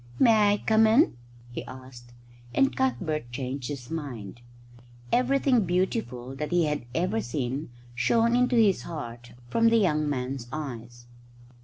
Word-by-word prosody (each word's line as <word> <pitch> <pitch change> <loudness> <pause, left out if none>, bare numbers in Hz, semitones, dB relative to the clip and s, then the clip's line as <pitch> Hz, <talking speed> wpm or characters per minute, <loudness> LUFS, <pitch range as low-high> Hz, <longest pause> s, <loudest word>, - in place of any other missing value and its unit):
"May 215 - +5
I - - +1
come 220 0 +5
in?" 235 +8 +4 0.4
he - - -5
asked, 130 -2 -12 0.4
and 270 - +3
Cuthbert 160 - -1
changed 130 +1 -4
his 140 -3 -7
mind. 120 -9 -6 0.7
Everything 255 -1 +3
beautiful 175 - -2
that 150 +1 -3
he 175 -2 +2
had 150 -4 -2
ever 185 +6 0
seen 130 +2 -3 0.2
shone 230 - +2
into 250 0 +2
his 215 -5 +4
heart 120 -7 -8 0.2
from 230 0 +4
the 230 - +4
young 155 -8 +2
man's 130 -2 -3
eyes. 120 -5 -7
150 Hz, 140 wpm, -27 LUFS, -, 0.7 s, May